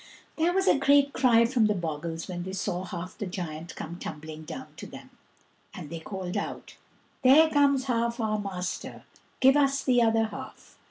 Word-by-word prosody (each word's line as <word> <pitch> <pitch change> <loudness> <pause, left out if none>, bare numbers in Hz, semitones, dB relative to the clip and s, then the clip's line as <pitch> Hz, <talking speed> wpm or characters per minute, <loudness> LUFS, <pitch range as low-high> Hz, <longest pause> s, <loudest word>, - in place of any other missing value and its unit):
There 330 +2 +2
was 385 +1 +1
a - - +4
great 280 0 +4
cry 235 -3 +4
from 230 -2 +2
the 210 - +1
bogles 165 -1 -4
when 175 -1 -5
they 190 +2 -6
saw 185 -1 -3
half 180 0 -7
the 205 - -5
giant 170 -3 -6
come 170 +2 -7
tumbling 155 -1 -8
down 260 +11 -8
to - - -8
them, - - -12 0.6
and 170 -7 -8
they 165 - -5
called 185 +1 -6
out, - - -5 0.5
"There 285 +5 +7
comes 280 -2 +3
half 235 -2 -1
our 215 -1 0
master, 185 -3 -5 0.4
give 265 +1 +6
us 275 -1 +2
the 245 -2 +3
other 225 -1 +3
half." 210 -2 -10
215 Hz, 180 wpm, -27 LUFS, 175-265 Hz, 0.6 s, There